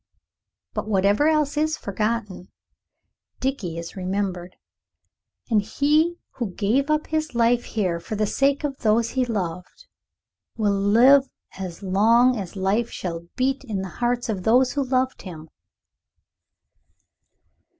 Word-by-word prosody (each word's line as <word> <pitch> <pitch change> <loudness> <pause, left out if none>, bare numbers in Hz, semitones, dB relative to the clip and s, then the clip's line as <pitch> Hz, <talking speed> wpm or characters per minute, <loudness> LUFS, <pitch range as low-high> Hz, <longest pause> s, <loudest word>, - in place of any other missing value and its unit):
But - - -4
whatever 205 +7 +3
else 305 -2 +1
is 310 +1 +1
forgotten, 210 -2 -3 0.9
Dickie 225 -11 -3
is 170 0 -7
remembered. 185 -1 -3 1.0
And 215 -2 +4
he 305 +9 +1 0.2
who 220 -8 -4
gave 250 +8 +1
up 305 0 +1
his 310 -4 -2
life 235 +1 +3
here 185 -6 -1
for 215 - -6
the 215 0 +1
sake 275 +7 +1
of 280 -2 -3
those 225 +1 +2
he 260 -1 0
loved 185 - -5 0.7
will 210 -3 +1
live 235 +8 +5 0.3
as 185 -1 -7
long 230 +6 +4
as 195 -3 -6
life 200 +5 0
shall 170 -2 -6
beat 265 +2 0
in 210 -7 -3
the 190 - -6
hearts 240 0 0
of 205 -5 -2
those 245 +5 +3
who 285 - -1
loved 260 0 -1
him. 160 -4 -10
225 Hz, 130 wpm, -23 LUFS, 190-265 Hz, 1.0 s, live